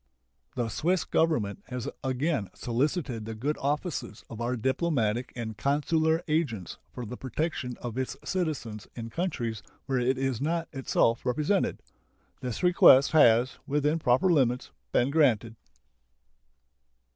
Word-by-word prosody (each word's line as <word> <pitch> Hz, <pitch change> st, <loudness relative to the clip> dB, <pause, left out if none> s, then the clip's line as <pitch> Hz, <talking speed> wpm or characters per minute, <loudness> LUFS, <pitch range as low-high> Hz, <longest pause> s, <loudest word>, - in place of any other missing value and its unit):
The 120 Hz, -2 st, -1 dB
Swiss 170 Hz, -, +1 dB
Government 120 Hz, -12 st, 0 dB
has 125 Hz, -2 st, -5 dB, 0.2 s
again 130 Hz, -, -1 dB
solicited 125 Hz, -, -1 dB
the 110 Hz, 0 st, -5 dB
good 140 Hz, +8 st, -1 dB
offices 145 Hz, -, -3 dB
of 115 Hz, 0 st, -7 dB
our 120 Hz, +2 st, 0 dB
diplomatic 125 Hz, -2 st, 0 dB
and 115 Hz, -3 st, -5 dB
consular 160 Hz, -, +1 dB
agents 145 Hz, -, -1 dB
for 125 Hz, -, -6 dB
the 115 Hz, -, -6 dB
protection 135 Hz, -2 st, -3 dB
of 120 Hz, +1 st, -4 dB
its 130 Hz, -, -3 dB
citizens 145 Hz, -, -3 dB
in 115 Hz, -1 st, -6 dB
countries 120 Hz, -, -2 dB, 0.2 s
where 130 Hz, -2 st, 0 dB
it 125 Hz, +2 st, +1 dB
is 135 Hz, -3 st, -1 dB
not 165 Hz, +3 st, -1 dB
itself 120 Hz, -3 st, +1 dB
represented. 150 Hz, +10 st, 0 dB, 0.6 s
This 125 Hz, +3 st, -4 dB
request 140 Hz, -6 st, +7 dB
has, 125 Hz, -5 st, +5 dB
within 150 Hz, +3 st, +1 dB
proper 150 Hz, +7 st, +3 dB
limits, 125 Hz, -4 st, +1 dB, 0.2 s
been 125 Hz, +3 st, +2 dB
granted. 120 Hz, -7 st, +2 dB
130 Hz, 130 wpm, -28 LUFS, 115-155 Hz, 0.6 s, request